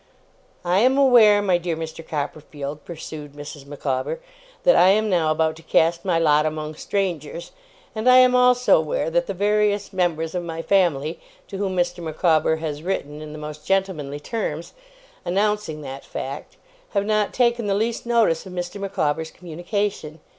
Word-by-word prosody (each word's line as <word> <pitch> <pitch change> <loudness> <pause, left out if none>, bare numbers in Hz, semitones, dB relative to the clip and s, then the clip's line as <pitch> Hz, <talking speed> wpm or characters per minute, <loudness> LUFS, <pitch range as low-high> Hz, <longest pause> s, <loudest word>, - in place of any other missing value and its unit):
'I 180 +2 +3
am 255 +4 +4
aware, 230 -7 +6
my 185 -3 +2
dear 170 -2 -3
Mr. 160 0 -6
Copperfield,' 150 -1 -5
pursued 155 -3 -8
Mrs. 145 -1 -10
Micawber, 140 - -3 0.4
'that - - +5
I - - +6
am 210 +2 +3
now 165 -4 +2
about 160 0 +1
to - - -13
cast 165 +1 +2
my 180 -4 +1
lot 150 -2 +4
among 155 0 -3
strangers; 170 -3 -3 0.4
and 220 +2 +1
I 255 - +8
am 255 0 +6
also 250 -3 +5
aware 160 +1 -2
that 175 +1 +1
the 195 - -4
various 205 +1 +1
members 165 -3 0
of 180 - -1
my 165 -1 -5
family, 165 -6 +1 0.3
to 195 - -6
whom 195 -2 -1
Mr. 175 0 0
Micawber 160 0 +2
has 155 -2 -5
written 155 -4 -3
in 155 -1 -8
the 155 - -8
most 150 0 -8
gentlemanly 165 -7 -1
terms, 170 -3 -4 0.5
announcing 200 -3 -1
that 135 -1 -8
fact, 135 +1 -7 0.4
have 200 0 +2
not 215 -1 +1
taken 235 -3 +1
the 195 - +1
least 230 +3 -2
notice 220 -8 +2
of 185 - -9
Mr. 180 +2 -5
Micawber's 160 -5 -1
communication. 175 -1 -4
175 Hz, 170 wpm, -22 LUFS, 155-205 Hz, 0.5 s, I